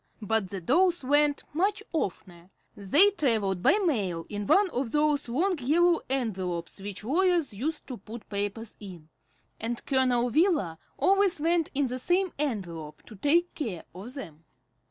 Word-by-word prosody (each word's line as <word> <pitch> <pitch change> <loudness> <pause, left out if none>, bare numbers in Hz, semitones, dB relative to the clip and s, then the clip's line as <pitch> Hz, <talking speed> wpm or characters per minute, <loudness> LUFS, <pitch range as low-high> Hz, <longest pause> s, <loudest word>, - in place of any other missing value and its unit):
But 210 -2 0
the 195 - -5
dolls 345 - +2
went 290 +2 +2
much 395 +6 0
oftener. 180 - -4 0.3
They 290 - +5
travelled 220 - 0
by 390 - +5
mail, 190 - -1
in 205 -1 -4
one 400 +1 +5
of 250 -2 -2
those 295 -3 +1
long 345 +8 0
yellow 335 +6 +3
envelopes 190 -10 -2
which 205 +1 -6
lawyers 335 - +1
use 300 +10 -3
to 255 - -8
put 215 +2 -10
papers 205 +2 -4
in, 175 -6 -11 0.5
and 235 +2 -4
Colonel 250 -3 +2
Wheeler 300 - +2 0.2
always 390 -3 +3
went 330 +1 +1
in 285 0 +2
the 255 0 -3
same 360 +6 +1
envelope 175 - -4
to 215 - -12
take 330 - +2
care 210 - -4
of 210 +9 -9
them. 165 - -9
250 Hz, 155 wpm, -28 LUFS, 200-320 Hz, 0.5 s, They